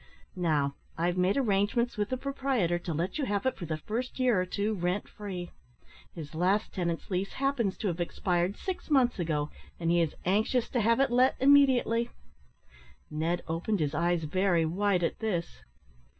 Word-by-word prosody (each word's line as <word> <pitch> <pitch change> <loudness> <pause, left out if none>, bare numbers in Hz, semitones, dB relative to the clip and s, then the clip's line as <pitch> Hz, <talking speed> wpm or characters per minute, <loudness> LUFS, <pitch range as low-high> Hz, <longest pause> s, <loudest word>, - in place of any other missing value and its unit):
Now, 155 -6 +1 0.2
I've 175 +2 +1
made 185 +4 +2
arrangements 235 0 +1
with 210 0 -1
the 255 - -1
proprietor 260 -10 0
to 170 - -5
let 170 - -2
you 285 - 0
have 205 -1 -1
it 260 - +1
for 175 - -7
the 155 0 -2
first 230 +10 -4
year 245 -7 +3
or 185 - -3
two 205 +3 -1
rent 180 +1 -1
free. 185 -4 -7 0.6
His 155 -3 -8
last 185 +6 +1
tenant's 170 -1 -3
lease 190 +2 -1
happens 265 -8 0
to 210 - -2
have 175 -2 -2
expired 175 +2 0
six 375 -4 -5
months 255 -7 +3
ago, 155 -3 -1 0.3
and 165 -1 +1
he 175 0 +4
is 160 -3 -1
anxious 215 +6 +1
to 245 - 0
have 230 +3 +3
it 270 -2 +3
let 255 +2 +4
immediately." 260 -4 +4 1.0
Ned 165 +3 -1
opened 175 +6 -1
his 150 -2 0
eyes 170 +1 +1
very 175 +1 +2
wide 185 +2 +1
at - - -1
this. 175 - -3
190 Hz, 180 wpm, -29 LUFS, 170-235 Hz, 1.0 s, he